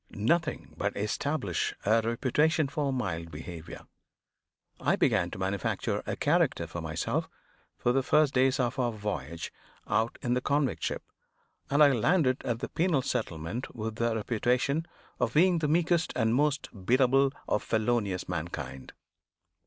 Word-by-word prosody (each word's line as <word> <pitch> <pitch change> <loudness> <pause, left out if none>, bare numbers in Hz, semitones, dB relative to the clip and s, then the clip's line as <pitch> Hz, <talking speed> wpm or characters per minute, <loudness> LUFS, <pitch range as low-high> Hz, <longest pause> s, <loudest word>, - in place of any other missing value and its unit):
Nothing 155 +10 0
but 100 0 -2
establish 105 - -1
a 110 +3 +4
reputation 140 +7 +1
for 140 0 -1
mild 90 -10 -3
behavior. 80 +1 -8 0.9
I - - +2
began - - +2
to - - -8
manufacture 95 0 -1
a - - -1
character - - +2
for - - -6
myself - - -2 0.5
for 120 - +1
the 135 +2 +2
first 150 +1 +3
days 130 +1 +3
of 125 +1 0
our 120 -2 +1
voyage 85 - -5 0.3
out 115 +1 0
in 120 - +1
the 125 - +1
convict 140 0 0
ship; - - -2 0.7
and 145 +2 +5
I 145 - +7
landed 130 - +2
at 120 -1 -2
the - - -3
penal 165 -6 +1
settlement 85 +4 -3
with 110 -1 -4
the 115 -1 +1
reputation 125 +8 0 0.3
of - - 0
being 175 +2 +5
the 155 - 0
meekest 170 +1 +2
and 110 -2 +2
most 145 +2 +1
biddable 130 +5 +4 0.2
of 105 - +1
felonious 110 -4 0
mankind. 65 - -5
125 Hz, 145 wpm, -29 LUFS, 105-145 Hz, 0.9 s, I